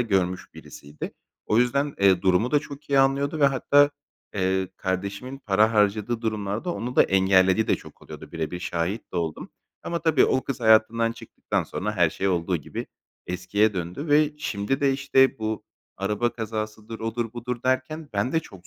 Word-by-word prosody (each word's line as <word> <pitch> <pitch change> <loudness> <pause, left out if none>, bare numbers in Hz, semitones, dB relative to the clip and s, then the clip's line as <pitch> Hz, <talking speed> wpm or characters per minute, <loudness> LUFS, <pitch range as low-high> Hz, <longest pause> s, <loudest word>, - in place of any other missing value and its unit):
görmüş 95 -6 -1
birisiydi. 75 +1 -9 0.3
O 110 - +2
yüzden, 140 +4 +1
eee, 95 -2 +4
durumu 95 +6 +2
da 150 - +4
çok 145 0 -11
iyi 140 - +4
anlıyordu 140 +3 +2
ve 140 - +6
hatta, 145 +2 +4 0.4
eee, 95 -1 0
kardeşimin 100 +8 -4
para 110 -2 +2
harcadığı 105 +2 +1
durumlarda 110 - -2
onu 125 +2 -5
da - - +8
engellediği 95 +2 +3
de - - +4
çok - - -15
oluyordu, - - -11
bire 80 -2 -3
bir 90 0 -5
şahit 90 +6 -3
de - - -4
oldum. 80 -3 -3 0.3
Ama 170 - -2
tabii 160 -4 +3
o 130 - +1
kız 135 -2 -4
hayatından 115 +1 +4
çıktıktan 115 - -3
sonra 105 +3 -4
her 85 -3 +4
şey 100 - -1
olduğu 90 0 0
gibi 75 - -6 0.4
eskiye 100 +4 +1
döndü 90 - -4
ve 150 0 +4
şimdi 125 -2 -2
de, 140 -1 +3
işte, 135 -1 +3
bu 110 0 -3 0.3
araba 105 +5 0
kazasıdır, 110 0 -5
odur, 115 0 -3
budur 120 0 -5
derken 130 +4 -1
ben 105 +5 -1
de 160 - +2
çok 95 - -14
110 Hz, 175 wpm, -25 LUFS, 95-130 Hz, 0.4 s, da